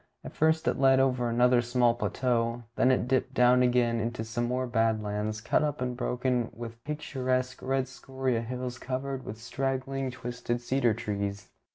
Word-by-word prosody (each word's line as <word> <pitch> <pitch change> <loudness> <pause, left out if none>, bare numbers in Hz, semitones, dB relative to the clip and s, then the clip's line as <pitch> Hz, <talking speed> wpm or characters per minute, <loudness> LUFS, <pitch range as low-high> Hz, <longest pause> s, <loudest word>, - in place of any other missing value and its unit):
At - - -8
first 160 +1 +2
it - - +1
led 135 -1 +5
over 125 -2 +2
another 120 +1 +4
small 120 0 +3
plateau, 120 -1 -1
then 130 - +3
it 130 -2 +2
dipped 130 0 0
down 125 0 +5
again 120 -2 +3
into 115 0 -2
some 120 +2 -2
more 125 +1 -1
bad 115 -3 +1
lands, 105 +1 -3
cut 115 - +2
up 150 -1 -1
and 125 -1 -2
broken 125 -1 0
with 115 0 -8
picturesque 130 -4 -2
red 135 0 0
scoria 130 -2 -2
hills 125 +1 -5
covered 130 0 -3
with 110 - -7
straggling 135 +2 -2
twisted 120 -1 -4
cedar 120 -2 +1
trees. 100 -3 -4
125 Hz, 170 wpm, -29 LUFS, 115-130 Hz, -, led